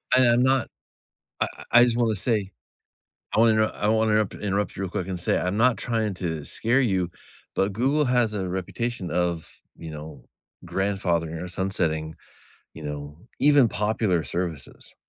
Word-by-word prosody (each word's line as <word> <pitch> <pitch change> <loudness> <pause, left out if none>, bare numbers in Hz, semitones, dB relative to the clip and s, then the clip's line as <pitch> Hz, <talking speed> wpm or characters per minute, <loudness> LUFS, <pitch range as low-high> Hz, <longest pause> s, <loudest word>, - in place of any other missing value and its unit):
And 130 -1 +6
I'm 120 +1 +4
not 130 -1 +2 0.7
I - - +3
I 120 - +3
I - - +8
just 120 -1 +2
wanna 115 -3 +2
say, 105 -1 0 0.8
I - - +3
wanna 110 -1 +5
I 105 -1 -3
wanna 110 0 +3
interrupt 105 -2 +2
interrupt 100 0 -2
you 100 - -3
real 95 - -3
quick 95 -2 -3
and 95 -2 -3
say, 85 - +1
I'm 90 +3 -1
not 120 -1 +4
trying 110 -3 -1
to 80 -5 -4
scare 125 +4 +1
you, 95 -7 +1 0.5
but 95 0 +1
Google 135 +7 +2
has 120 -3 +2
a 95 -3 -2
reputation 95 +1 -3
of, 85 -1 -1 0.3
you 80 -1 -8
know, 75 0 -9 0.4
grandfathering 85 -5 -1
or 90 - -5
sunsetting, 85 -4 -2 0.6
you 80 - -10
know, 75 0 -6 0.2
even 140 -3 +6
popular 105 -6 0
services. 80 0 -5
100 Hz, 165 wpm, -25 LUFS, 85-115 Hz, 0.8 s, I